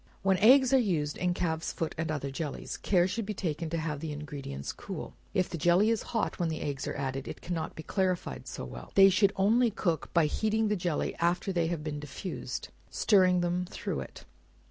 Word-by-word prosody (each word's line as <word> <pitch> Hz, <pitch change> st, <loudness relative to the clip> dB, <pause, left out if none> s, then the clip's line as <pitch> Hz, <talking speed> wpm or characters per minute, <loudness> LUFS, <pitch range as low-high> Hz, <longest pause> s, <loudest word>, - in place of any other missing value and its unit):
When 190 Hz, -1 st, +3 dB
eggs 260 Hz, +4 st, +6 dB
are 265 Hz, -, +7 dB
used 160 Hz, -10 st, 0 dB
in 180 Hz, -1 st, 0 dB
calf's 160 Hz, -2 st, -1 dB
foot 165 Hz, -, -3 dB
and 160 Hz, 0 st, -2 dB
other 140 Hz, -3 st, -2 dB
jellies, 145 Hz, +1 st, -4 dB
care 180 Hz, -3 st, +2 dB
should 225 Hz, +5 st, -2 dB
be 210 Hz, -, -3 dB
taken 165 Hz, -3 st, -2 dB
to 165 Hz, -, -2 dB
have 155 Hz, -3 st, -2 dB
the 160 Hz, 0 st, -4 dB
ingredients 145 Hz, -, -6 dB
cool. -, -, -7 dB, 0.2 s
If 185 Hz, -, +2 dB
the 170 Hz, -3 st, -5 dB
jelly 175 Hz, +8 st, +4 dB
is 225 Hz, -, 0 dB
hot 225 Hz, -4 st, -1 dB
when 170 Hz, -2 st, +1 dB
the 160 Hz, -, -3 dB
eggs 140 Hz, -2 st, -3 dB
are -, -, -3 dB
added, 135 Hz, -1 st, -3 dB
it -, -, -6 dB
cannot 170 Hz, -2 st, -3 dB
be 160 Hz, -, -7 dB
clarified 185 Hz, -1 st, -1 dB
so -, -, -5 dB
well -, -, -9 dB
they 195 Hz, 0 st, +9 dB
should 200 Hz, +1 st, +4 dB
only 225 Hz, +5 st, +4 dB
cook 175 Hz, -6 st, -1 dB
by 170 Hz, -2 st, +4 dB
heating 220 Hz, +6 st, +1 dB
the 210 Hz, -, +2 dB
jelly 175 Hz, -5 st, -1 dB
after 175 Hz, +3 st, +1 dB
they 170 Hz, -2 st, +1 dB
have 165 Hz, -3 st, -3 dB
been 150 Hz, -1 st, -4 dB
diffused, 150 Hz, +6 st, -5 dB
by -, -, -31 dB, 0.2 s
stirring 185 Hz, -4 st, +4 dB
them 175 Hz, +1 st, 0 dB
through 180 Hz, -, -4 dB
it. -, -, -9 dB
175 Hz, 215 wpm, -30 LUFS, 155-195 Hz, 0.2 s, they